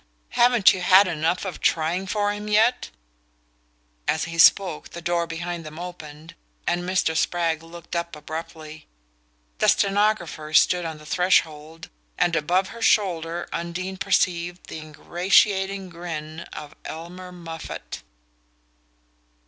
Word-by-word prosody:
Haven't 240 -4 +5
you 185 - -4
had 185 +2 +6
enough 165 +3 -1
of 190 - -6
trying 170 +4 +1
for 205 +1 0
him 210 0 -7
yet?" 220 +4 +2 1.2
As 155 - +1
he 165 0 -5
spoke 175 -1 +5
the 170 - -8
door 170 0 0
behind 170 +1 -5
them 155 0 -10
opened, 165 -2 -9 0.3
and 175 0 0
Mr. 180 -2 0
Spragg 165 -1 0
looked 170 +1 -10
up 170 -1 -3
abruptly. 155 0 -8 0.7
The - - +3
stenographer 195 -7 +1
stood 180 +1 +4
on 160 -1 -5
the 150 - -14
threshold, 160 -2 0 0.3
and 170 - +2
above 180 +5 +1
her 230 - -10
shoulder 175 -6 +1
Undine 180 +3 -4
perceived 175 -2 0
the - - -6
ingratiating 190 +5 +1
grin 165 -2 -6
of 150 0 -9
Elmer 180 +3 -8
Moffatt. 165 -2 -8
170 Hz, 125 wpm, -24 LUFS, 160-185 Hz, 1.2 s, had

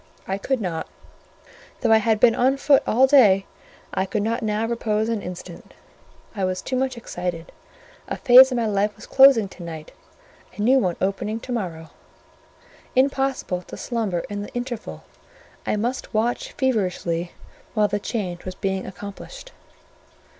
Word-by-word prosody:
I 195 +1 -2
could 265 +5 -1
not; 175 -6 -3 0.9
though 235 - +2
I 220 - +8
had 220 0 +1
been 235 -1 +6
on 260 +4 +2
foot 280 0 +4
all 255 +4 +5
day, 215 -9 +5 0.5
I 190 - 0
could 205 +2 -1
not 230 +3 -1
now 215 0 -1
repose 225 -1 -1
an 225 -3 -1
instant; 180 -1 -9 0.6
I 195 - -2
was 185 0 -1
too 260 - -3
much 260 -1 -1
excited. 175 -6 -5 0.6
A - - -4
phase 260 +1 +8
of - - -1
my 235 - 0
life 205 0 0
was - - -12
closing 265 -6 +6
to 185 - -13
night, 160 -2 -8 0.7
a - - -3
new 260 +4 +5
one 180 -7 0
opening 200 +3 -2
to 255 - -8
morrow: 170 -9 -4 1.0
impossible 270 -8 +1
to - - -10
slumber 215 -8 -2
in 205 0 -5
the 205 - -7
interval; 245 - -5 0.6
I - - +1
must 235 +2 -3
watch 230 +3 -1
feverishly 180 -8 -1 0.4
while 210 -1 +3
the 205 0 -2
change 190 -6 -4
was 185 0 -6
being 190 0 -3
accomplished. 205 - -9
215 Hz, 160 wpm, -23 LUFS, 190-245 Hz, 1.0 s, I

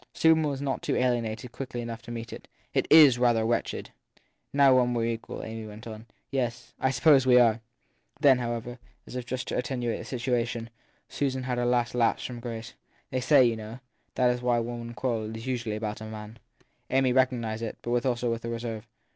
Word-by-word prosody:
Susan 160 0 +5
was 140 -2 -2
not 135 -1 -2
too - - -1
alienated 120 -1 -1
quickly 125 -1 -6
enough 115 -1 -5
to 115 - -13
meet 115 0 -6
it. - - -10 0.3
It - - +1
is 145 -6 +8
rather 120 -2 +3
wretched. 115 0 -2 0.3
7 - - -30
( - - -46
Now 140 -2 +6
when 125 -1 +3
we 115 - 0
re 115 0 +1
equal/ 115 - -7
Amy 110 -1 -6
went 105 +1 -11
on. 110 0 -9 0.2
Yes 125 -2 -3
I 130 - +2
suppose 135 +1 +4
we 125 -1 +7
are. 115 -2 +4 0.6
Then, 140 -4 +5
however, 120 0 -4 0.3
as - - -10
if 125 -1 -5
just 125 0 -4
to - - -2
attenuate 125 -2 -2
the - - -4
admission, 120 -2 -1 0.4
Susan 130 -2 -2
had 125 -1 -2
her 120 - +1
last 120 -1 +1
lapse 120 -2 +1
from 125 -1 -6
grace. 115 -2 -6
t - - -19 0.4
They 130 - -1
say, 135 0 +6
you 115 -1 +2
know, 110 +2 -8 0.4
that 125 -1 +2
when 120 -2 +1
women 120 0 -5
do 120 - -8
quarrel 110 -1 -2
it 110 - -6
s 115 - -8
usually 120 -4 -2
about 105 0 -4
a - - -6
man. 110 +1 -9 0.5
7 130 - +1
Amy 130 -2 +3
recognised 120 -4 +1
it, 115 -2 -4
but 120 0 0
also 120 -2 0
with 115 0 -3
a 115 - -4
reserve. 115 -1 -5
120 Hz, 220 wpm, -27 LUFS, 115-125 Hz, 0.6 s, is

